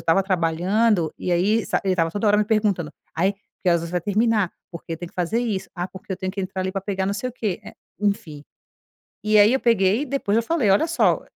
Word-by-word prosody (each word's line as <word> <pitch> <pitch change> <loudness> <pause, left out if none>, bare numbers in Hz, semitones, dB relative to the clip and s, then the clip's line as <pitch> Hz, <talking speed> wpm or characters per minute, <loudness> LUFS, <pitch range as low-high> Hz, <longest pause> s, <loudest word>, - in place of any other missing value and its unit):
estava 165 +4 +3
trabalhando 185 +1 +1
e - - -3
aí, 205 +6 +2
sa - - +1
ele 190 - +2
estava 165 -2 +1
toda 205 +5 -2
hora 205 - +5
me 210 - +3
perguntando: 205 -7 0 0.2
"Ai, 190 +5 +1 0.3
que 185 - +1
horas 170 -1 +3
você 170 - -6
vai 180 - 0
terminar? 210 0 +1 0.2
Porque, 165 -1 -6
tem 175 +2 -7
que - - -25
fazer 180 +6 0
isso. 195 -6 -2
Ah, 175 0 -3
porque 190 +1 -8
eu - - -3
tenho 185 0 -4
que 200 - -4
entrar 190 0 -3
ali 185 - -2
para 195 - -2
pegar 195 -1 -2
não 200 - 0
sei 235 +5 -3
o - - -17
quê", 215 -7 -3
eh, - - -10 0.3
enfim. 170 -8 -2 0.8
E 215 0 +3
aí, 210 +4 +6
eu 265 - +2
peguei 210 -1 +3
e - - -2
depois 255 -7 -1
eu - - +3
falei: 275 -5 +1
"Olha 205 +12 +3
só, 335 - +2
eh, - - -21
195 Hz, 255 wpm, -23 LUFS, 180-215 Hz, 0.8 s, aí